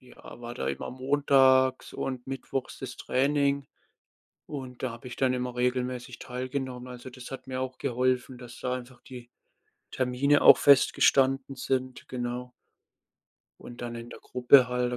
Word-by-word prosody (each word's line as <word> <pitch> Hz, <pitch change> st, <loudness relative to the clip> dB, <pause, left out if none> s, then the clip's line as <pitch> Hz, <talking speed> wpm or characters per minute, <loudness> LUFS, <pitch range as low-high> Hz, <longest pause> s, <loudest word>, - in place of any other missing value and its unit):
ja, 125 Hz, -1 st, -14 dB
war 120 Hz, 0 st, -7 dB
da -, -, -4 dB
immer -, -, -4 dB
montags 130 Hz, -1 st, +3 dB
und 130 Hz, -2 st, -4 dB
mittwochs 135 Hz, 0 st, -5 dB
das -, -, -7 dB
Training 140 Hz, +1 st, +1 dB, 0.8 s
und 130 Hz, -3 st, -7 dB
da 130 Hz, -, -1 dB
habe 120 Hz, +2 st, -10 dB
ich 120 Hz, -, -9 dB
dann 130 Hz, -1 st, +2 dB
immer 125 Hz, -1 st, -3 dB
regelmäßig 125 Hz, 0 st, -2 dB
teilgenommen. 130 Hz, 0 st, -5 dB
Also, 125 Hz, +1 st, -9 dB
das 125 Hz, 0 st, -11 dB
hat 135 Hz, -, -8 dB
mir 130 Hz, 0 st, -3 dB
auch 130 Hz, 0 st, -4 dB
geholfen, 125 Hz, +1 st, -1 dB
dass 120 Hz, -1 st, -11 dB
da 125 Hz, 0 st, -1 dB
einfach 125 Hz, 0 st, -9 dB
die 125 Hz, -2 st, -11 dB, 0.6 s
Termine 130 Hz, +3 st, +2 dB
auch -, -, +9 dB
festgestanden 135 Hz, -1 st, +4 dB
sind. 130 Hz, 0 st, -3 dB
Genau. 125 Hz, 0 st, -4 dB, 1.1 s
Und 120 Hz, 0 st, -10 dB
dann 120 Hz, -1 st, -5 dB
in 115 Hz, 0 st, -8 dB
der -, -, -11 dB
Gruppe 125 Hz, +1 st, +5 dB
halt, 125 Hz, 0 st, -1 dB
da -, -, -2 dB
130 Hz, 155 wpm, -28 LUFS, 125-130 Hz, 1.1 s, auch